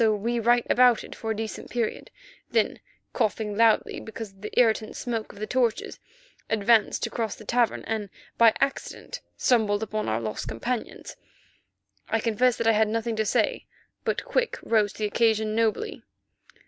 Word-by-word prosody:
So 220 -2 +4
we 235 +3 -1
right 240 +1 +3
abouted 245 -2 +4
for 225 - -6
a 220 - 0
decent 220 0 -5
period, 235 -3 -2 0.4
then, - - +1 0.3
coughing 210 -1 -1
loudly—because 220 -1 +1
of 195 0 -23
the 210 - -2
irritant 220 -2 +2
smoke 230 -3 -3
of - - -16
the 215 - -3
torches—advanced 235 - 0
to - - 0
cross 225 -3 -2
the 215 - -13
cavern, 240 +1 +1
and 215 -2 -3 0.3
by 230 -1 +6
accident 275 0 -3 0.2
stumbled 220 -4 +2
upon 215 0 -2
our 110 +1 0
lost 110 +1 -4
companions. 220 - -4 0.9
I 225 - +1
confess 230 +2 +2
that 230 - -2
I 225 - +6
had 220 0 +3
nothing 225 +1 -1
to 220 - +1
say, - - 0 0.4
but - - -1
Quick - - 0
rose 215 -3 +2
to - - -15
the 215 - -1
occasion 220 0 +1
nobly. 225 -1 0
225 Hz, 160 wpm, -26 LUFS, 215-235 Hz, 0.9 s, by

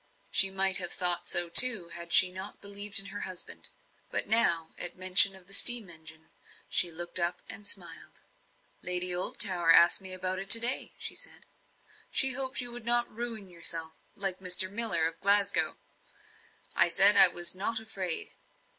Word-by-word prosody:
She 195 - +2
might 190 0 +1
have 175 -3 -4
thought 180 -1 -2
so 175 0 +3
too, 200 -1 +7
had 170 0 -11
she 180 +1 +5
not 190 +2 -12
believed 200 0 -4
in 195 - -2
her 205 - -10
husband. 185 -3 -10 0.4
But - - -5
now, 170 -8 -2
at 175 - -6
mention 185 +1 +3
of 190 -1 -19
the 195 - -11
steam 230 -3 +4
engine, 160 -1 -16 0.4
she 175 - 0
looked 175 +2 -3
up 175 +1 -4
and 215 -2 -6
smiled. - - -7 0.6
"Lady 180 0 -1
Oldtower 175 -1 -2
asked 170 +3 +2
me 190 -1 -7
about 185 0 -6
it 195 +1 -11
to 230 - +10
day. 240 +3 -2
She - - -9
said, - - -11 0.6
'she 265 -1 0
hoped 260 0 -4
you 245 -1 -6
would 240 -1 -13
not 240 +1 -4
ruin 225 -3 -10
yourself, 165 -2 -5 0.2
like 195 -2 -5
Mr. 185 0 -1
Miller 210 -7 -1
of 165 0 -5
Glasgow!' 200 0 +2 1.0
I - - +2
said 195 +4 +8
I - - +7
was 175 -1 -5
not 215 +4 -7
afraid." 190 -6 -5
190 Hz, 170 wpm, -24 LUFS, 175-210 Hz, 1.0 s, to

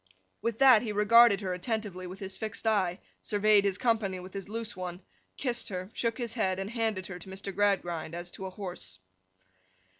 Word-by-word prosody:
With 230 -2 -1
that 255 -4 +7
he 225 - -3
regarded 210 0 +6
her 185 -2 -2
attentively 190 -1 -3
with 185 +2 -8
his 195 -1 -6
fixed 220 0 -5
eye, 190 -5 +2 0.2
surveyed 210 0 +4
his 200 -1 +1
company 220 -6 +1
with 185 +1 -10
his 195 0 -6
loose 230 +1 -5
one, 180 0 -6 0.3
kissed 245 -4 -1
her, 185 +1 -5
shook 230 -1 -1
his 235 -3 -3
head, 190 -6 0
and 195 +2 -4
handed 220 -5 -1
her 180 -2 -7
to 185 - -10
Mr. 195 +1 -6
Gradgrind 175 -5 0
as 175 0 -5
to 190 - -6
a - - -5
horse. 180 - -6
200 Hz, 190 wpm, -30 LUFS, 185-225 Hz, 0.3 s, that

